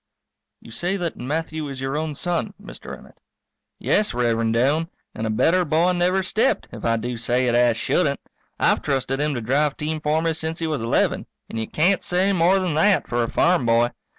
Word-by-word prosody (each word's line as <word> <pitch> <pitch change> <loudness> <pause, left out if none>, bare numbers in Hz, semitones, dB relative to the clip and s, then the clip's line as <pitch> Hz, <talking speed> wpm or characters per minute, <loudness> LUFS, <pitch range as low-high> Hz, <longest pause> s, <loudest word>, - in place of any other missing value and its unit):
You - - -13
say 180 +10 -2
that 175 -3 -3
Matthew 155 +2 -3
is 135 -1 -7
your 135 +1 -3
own 155 -1 -2
son, 175 +6 -2
Mr. 205 - -9
Emmett? - - -18 0.6
Yes, 210 - 0
Rev'rend 115 -2 +1
Doane, 145 +7 +1 0.2
and 110 - -3
a - - -2
better 165 +12 +2
boy 165 +3 +2
never 180 +2 +1
stepped, 225 +7 0
if 110 - -9
I 115 0 +1
do 120 +2 -4
say 120 +2 +1
it 120 - +1
as 120 -1 +3
shouldn't. 140 +2 0 0.4
I've - - +2
trusted 135 -1 -1
him 150 -1 0
to 120 - -3
drive 140 +5 +1
team 155 +1 -3
for 155 +2 +1
me 165 -1 +1
since 160 +1 -4
he 165 - -3
was 155 -6 -2
eleven, 115 - 0 0.2
and 115 - -4
you 110 - -3
can't 180 +5 +1
say 185 +3 +1
more 180 +2 +3
than 185 -4 -1
that 190 +7 +3
for 120 0 0
a 115 - -1
farm 170 -8 +2
boy. 115 +1 +3
150 Hz, 205 wpm, -22 LUFS, 120-175 Hz, 0.6 s, as